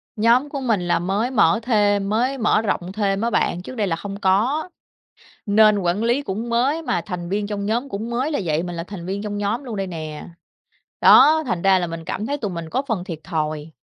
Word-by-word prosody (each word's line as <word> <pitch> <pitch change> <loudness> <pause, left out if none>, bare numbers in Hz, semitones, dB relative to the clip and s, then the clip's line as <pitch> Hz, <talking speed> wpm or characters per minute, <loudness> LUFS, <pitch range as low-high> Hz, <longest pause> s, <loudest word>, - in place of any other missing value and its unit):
Nhóm 235 +6 +3
của 280 -1 -5
mình 225 -7 +1
là 175 - +2
mới 200 +8 -1
mở 200 -7 +3
thêm, 205 -4 +2
mới 250 +6 0
mở 220 -2 +2
rộng 185 -4 -2
thêm 200 -1 0
á 230 - +1
bạn, 175 -6 0
trước 225 - -9
đây 210 -4 0
là 165 - 0
không 200 +3 -7
có, 225 - +1 0.8
nên 210 0 +5
quản 180 +2 0
lý 240 +5 +1
cũng 220 0 -4
mới 260 +7 +1
mà 180 - -1
thành 175 -1 -6
viên 205 +2 -1
trong 200 -1 -4
nhóm 235 +6 -1
cũng 220 +1 -5
mới 255 +5 -1
là 290 - 0
vậy, 160 -1 0
mình 175 -1 -5
là 170 - -4
thành 180 -2 -8
viên 195 +2 -3
trong 210 -1 -4
nhóm 205 +6 -2
luôn 235 -5 -5
đây 195 -1 -2
nè. 155 -4 -7 0.7
Đó, 315 +1 +7
thành 180 -7 -2
ra 195 -1 +5
là 180 - -1
mình 165 -1 -7
cảm 210 +6 -4
thấy 285 +3 -2
tụi 210 -7 -3
mình 170 -2 -6
có 260 - 0
phần 205 -7 -1
thiệt 170 -5 -6
thòi 155 -1 -3
205 Hz, 235 wpm, -21 LUFS, 180-235 Hz, 0.8 s, Đó